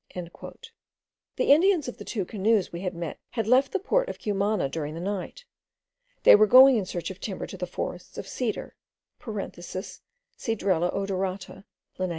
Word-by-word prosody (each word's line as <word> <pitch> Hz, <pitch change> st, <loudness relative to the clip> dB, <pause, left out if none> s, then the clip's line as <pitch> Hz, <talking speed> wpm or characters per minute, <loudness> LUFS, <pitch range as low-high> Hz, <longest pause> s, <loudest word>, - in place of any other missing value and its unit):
The 230 Hz, -, -6 dB
Indians 340 Hz, -1 st, +3 dB
of 245 Hz, -, -7 dB
the -, -, -7 dB
two 205 Hz, -6 st, -3 dB
canoes 210 Hz, 0 st, +1 dB
we 170 Hz, -, -5 dB
had 185 Hz, -1 st, -3 dB
met 170 Hz, -2 st, -5 dB
had 225 Hz, -, -1 dB
left 260 Hz, +4 st, +4 dB
the -, -, +1 dB
port -, -, 0 dB
of -, -, -6 dB
Cumana 205 Hz, -4 st, 0 dB
during 150 Hz, +1 st, -4 dB
the -, -, -6 dB
night. 200 Hz, -, -5 dB, 0.8 s
They -, -, +9 dB
were 215 Hz, +1 st, +5 dB
going 260 Hz, +3 st, +8 dB
in 195 Hz, -4 st, -2 dB
search 175 Hz, 0 st, -4 dB
of 190 Hz, -, -11 dB
timber 200 Hz, -3 st, -5 dB
to -, -, -9 dB
the 180 Hz, 0 st, -4 dB
forests 180 Hz, 0 st, -6 dB
of 195 Hz, -, -6 dB
cedar 230 Hz, +1 st, -4 dB, 0.5 s
(Cedrela 210 Hz, -, -4 dB
odorata, 195 Hz, 0 st, -3 dB, 0.3 s
Linn.) 185 Hz, 0 st, -1 dB
200 Hz, 160 wpm, -26 LUFS, 185-255 Hz, 0.8 s, They